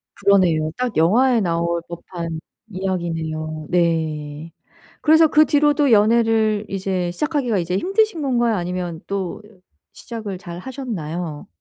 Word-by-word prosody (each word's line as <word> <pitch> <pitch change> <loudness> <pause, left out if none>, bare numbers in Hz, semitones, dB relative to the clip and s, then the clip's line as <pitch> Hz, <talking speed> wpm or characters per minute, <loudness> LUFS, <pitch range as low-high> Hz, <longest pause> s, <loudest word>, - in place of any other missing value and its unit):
그러네요. 180 -6 +3
딱 250 -6 -2
영화에 235 +9 +4
나올 170 -2 0
법한 170 -1 -6 0.3
이야기네요. 165 -5 -3
네. 160 -2 -1 0.5
그래서 315 +1 +6
그 305 0 +5
뒤로도 290 -2 +3
연애를 220 -1 +3
이제 190 -2 -2
시작하기가 280 - -1
이제 180 +1 -1
힘드신 390 - +1
건가요? 240 -4 +1
아니면 175 -2 -4
또 195 0 -4 0.5
시작을 215 -5 -7
잘하셨나요? 175 - -6
190 Hz, 285 characters per minute, -21 LUFS, 170-235 Hz, 0.5 s, 그래서